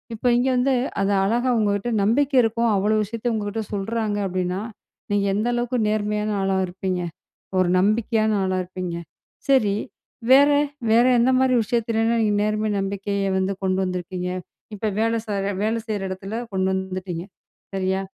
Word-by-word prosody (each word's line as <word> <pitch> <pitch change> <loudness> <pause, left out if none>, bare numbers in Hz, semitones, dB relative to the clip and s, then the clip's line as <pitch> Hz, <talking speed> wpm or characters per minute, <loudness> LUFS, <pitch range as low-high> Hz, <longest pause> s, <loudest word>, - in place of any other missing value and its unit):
இப்ப 220 - -11
இங்க 255 +2 +2
வந்து 260 +2 +2 0.3
அத 195 - +1 0.2
அழகா 240 +5 +1
உங்ககிட்ட 205 +1 0
நம்பிக்க 275 +7 +2
இருக்கும். 230 +1 +1
அவ்ளோ 205 +2 +2
விஷயத்த 230 +3 -3
உங்ககிட்ட 215 +1 -3
சொல்றாங்க 210 +1 -1
அப்டின்னா, 185 +1 -2 0.5
நீங்க 205 -1 +2
எந்த 215 +3 0
அளவுக்கு 240 0 -1
நேர்மையான 210 0 -1
ஆளா 195 0 +1
இருப்பீங்க? 185 0 -3 0.6
ஒரு 185 -1 +3
நம்பிக்கையான 215 +1 +2
ஆளா 185 0 0
இருப்பீங்க? 180 -1 -5 0.5
சரி 215 -7 +4 0.6
வேற 285 +2 +7 0.4
வேற 230 +2 +5
எந்த 245 +2 +4
மாரி 260 -1 +3
விஷயத்துலலாம் 225 +1 0
நீங்க 210 - +2
நேர்மை 215 0 0
நம்பிக்கைய 200 0 -2
வந்து 190 +1 0
கொண்டு 185 0 +1
வந்துருக்கீங்க. 180 0 -4 0.5
இப்ப 215 +2 -4
வேலை 230 +1 +1
செய்யற 200 -2 -1
வேலை 225 +2 +1
செய்ற 215 -2 -2
இடத்துல 195 +4 -5
கொண்டு 190 -1 0
வந்துட்டீங்க. 185 -2 -4 0.5
சரியா? 190 0 0
210 Hz, 145 wpm, -23 LUFS, 190-230 Hz, 0.6 s, வேற